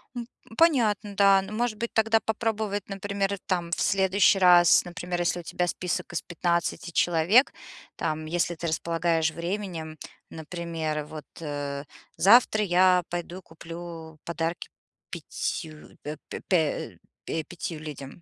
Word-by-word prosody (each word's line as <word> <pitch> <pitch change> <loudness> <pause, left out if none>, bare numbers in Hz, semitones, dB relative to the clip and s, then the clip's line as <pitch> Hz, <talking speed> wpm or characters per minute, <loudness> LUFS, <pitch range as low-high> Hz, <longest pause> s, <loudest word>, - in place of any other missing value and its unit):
М, 240 -1 -5 0.3
понятно, 220 -11 +3
да. 195 -1 +6
Но 195 +2 -8
может 230 0 -1
быть 235 +2 -4
тогда 220 0 +3
попробовать, 220 -2 -2
например, 200 0 -2
там 175 -3 -1
в - - -1
следующий 195 +1 +4
раз, 175 -1 +6
например, 175 0 -4
если 175 0 0
у 175 - -8
тебя 175 +2 -1
список 180 0 -3
из 175 - -1
15 170 0 -1
человек, 175 - +4 0.4
там, 155 -1 -2
если 175 +1 -1
ты 170 +1 -4
располагаешь 165 0 0
временем, 170 -3 -4 0.3
например, 160 -2 -4
вот, 155 -1 -9 0.2
э, 145 -2 -4 0.3
завтра 215 +1 +6
я 180 -1 +4
пойду 175 +1 -5
куплю 165 -1 -9
подарки 170 +1 -3 0.4
5 155 -3 -5
э 150 +1 -5
п - - -6
пя 185 - +4 0.7
э, 160 -1 -2
5 170 -2 -6
людям. 150 0 -9
175 Hz, 135 wpm, -26 LUFS, 165-200 Hz, 0.7 s, да